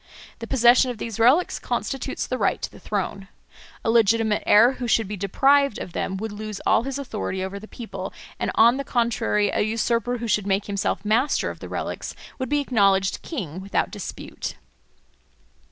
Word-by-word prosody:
The 230 - -6
possession 245 +1 +5
of 245 - -4
these 230 0 -5
relics 260 +10 +4
constitutes 270 0 -3
the 255 - -3
right 200 - +1
to - - -3
the - - -14
throne. 195 -1 -3 0.6
A 225 - +3
legitimate 225 -1 +3
heir 230 +4 +7
who 250 -2 -5
should 225 -2 +2
be 210 - -4
deprived 270 +7 +3
of 175 - -7
them 190 - -2
would 220 +2 -4
lose 215 0 -6
all - - +4
his 275 0 -3
authority 210 -8 -4
over 190 +1 -5
the 215 - -11
people, 235 0 -7 0.3
and - - -1
on 235 +3 +6
the 275 - -2
contrary 230 -4 +1
a - - -1
usurper 230 +2 0
who 235 0 -4
should 210 -2 +1
make 195 +1 +1
himself 200 0 -2
master 230 +7 +1
of - - -12
the - - -8
relics - - -4 0.2
would 260 -2 -3
be 290 0 +2
acknowledged 195 -7 +2
king 185 - -5
without 195 +1 -1
dispute. - - -6
225 Hz, 185 wpm, -24 LUFS, 200-245 Hz, 0.6 s, heir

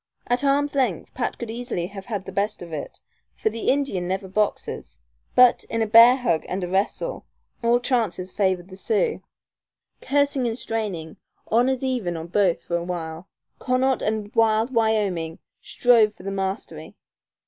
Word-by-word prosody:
At 245 +3 0
arms' 285 +1 +2
length 250 - -1
Pat 250 - -2
could 235 -2 -5
easily 235 -7 -3
have 195 +1 -9
had 205 -6 -4
the - - -7
best 205 -1 -1
of 170 -2 -10
it, 150 - -6 0.4
for 220 - -1
the 225 +1 -2
Indian 265 -11 0
never 190 +1 -2
boxes; 210 +2 -2 0.4
but, 250 -1 +6
in 230 -1 -1
a - - +1
bear 230 +3 +8
hug 205 -12 0
and 185 +1 -2
a - - -2
wrestle, 195 - -2 0.3
all 235 0 +3
chances 230 -7 -1
favored 190 -2 0
the 185 - -11
Sioux. 450 - 0 0.8
Cursing 280 -2 +1
and 225 0 -2
straining, 200 -10 -4 0.3
honors 250 +3 +2
even 235 -10 -1
on 160 - -6
both 185 -2 +2
for 170 - -1
a 170 - -4
while, 170 -1 -5 0.3
Connaught 255 0 +1
and 215 0 -2
wild 225 +2 +2
Wyoming 205 -8 0 0.2
strove 225 -4 +3
for - - -14
the 195 - -4
mastery. 195 +1 -4
215 Hz, 165 wpm, -24 LUFS, 185-245 Hz, 0.8 s, bear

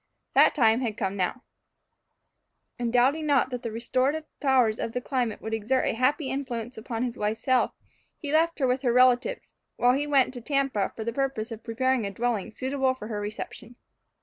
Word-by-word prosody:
That - - +5
time 225 -5 +4
had 225 -4 -2
now 190 -1 0
come. 250 - -18 1.4
And 240 -1 -1
doubting 270 +6 +2
not 275 -2 +3
that 250 -1 -4
the 230 - -4
restorative 255 +7 0 0.2
powers 255 -6 +3
of 230 - -3
the 250 - -1
climate 250 -4 -2
would 220 - -4
exert 225 +4 +1
a - - +1
happy 265 +5 +1
influence 250 -3 -4
upon 225 +1 -4
his 250 0 -3
wife's 215 +2 -2
health, 260 -1 +2 0.4
he 290 -3 -5
left 330 +1 +3
her 275 - +1
with 255 +1 +1
her 250 -3 +2
relatives, 255 - +3 0.2
while 245 +1 +4
he 290 +3 -1
went 275 -3 +3
to 245 - -7
Tampa 270 -6 0
for 220 - -5
the 230 +1 -3
purpose 265 -4 -2
of 225 0 -7
preparing 245 -1 0
a - - -5
dwelling 230 0 -1
suitable 260 +3 -1
for 215 -4 -8
her 210 -2 -3
reception. 215 +3 -7
250 Hz, 195 wpm, -27 LUFS, 225-265 Hz, 1.4 s, That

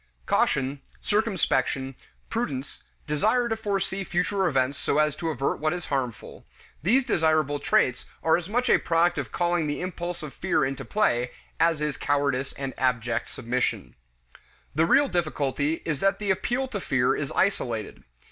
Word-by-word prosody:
Caution, 135 +1 +1 0.2
circumspection, 190 -10 0 0.3
prudence, 145 - -3 0.2
desire 215 +11 +2
to 225 - 0
foresee 195 -3 -2
future 190 +2 0
events 135 -2 +1
so 140 - 0
as 150 -1 +3
to 165 +1 -3
avert 140 -3 -1
what 155 +1 +1
is 175 -2 -5
harmful, 125 -4 -3 0.4
these 245 - +3
desirable 155 - +2
traits 125 -3 +2 0.2
are 160 - +5
as 175 +1 -3
much 245 +4 +1
a - - +5
product 170 0 +2
of 130 -6 -5
calling 175 -2 +1
the 145 - -2
impulse 175 -2 -4
of 150 - -7
fear - - +1
into 135 0 -3
play 125 - +1 0.3
as 165 -2 +3
is 150 -2 -1
cowardice 140 -2 0
and 135 -1 -5
abject 120 -3 0
submission. 120 - -2 0.8
The 160 +3 +3
real 285 +9 +5
difficulty 155 - -1
is 150 -4 -1
that 195 +4 +2
the 205 -2 0
appeal 245 +7 0
to 205 -6 -4
fear 125 -5 +2
is 140 -2 -3
isolated. 120 - -1
155 Hz, 155 wpm, -26 LUFS, 135-190 Hz, 0.8 s, are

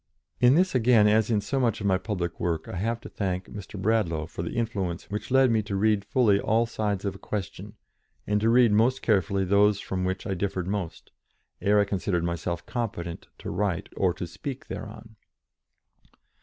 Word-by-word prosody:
In 125 +2 +6
this, 185 +3 +3
again, 120 -4 +5
as 110 +1 +3
in 110 -3 +2
so 135 +6 -2
much 115 -4 +1
of 100 - -5
my 95 -2 +3
public 90 -6 -3
work, 85 -2 -1
I - - -5
have 115 +5 -1
to - - -9
thank 95 -2 -2
Mr. 100 0 -9
Bradlaugh 95 -7 +1
for 80 - -7
the 85 - -5
influence 100 -7 -2
which 105 +5 -4
led 130 -1 +4
me 110 -1 +3
to 100 -1 -4
read 105 0 +2
fully 105 -1 +3
all 115 +3 +2
sides 105 -3 -2
of 100 - -1
a 95 - -12
question, 105 +1 -5 0.5
and 105 0 +1
to 110 - +3
read 120 -1 +5
most 120 +5 +2
carefully 100 -2 +2
those 100 +2 +4
from 95 -1 -3
which 95 +3 -2
I 100 - -1
differed 95 -1 -2
most, 95 -3 -4 0.5
ere 105 +1 +4
I 100 - +4
considered 95 -3 -1
myself 85 0 -3
competent 85 -8 -4
to - - -6
write 95 -2 -1
or 95 -2 +2
to - - -4
speak 120 - -7
thereon. 110 +1 -8
100 Hz, 195 wpm, -26 LUFS, 95-110 Hz, 0.5 s, In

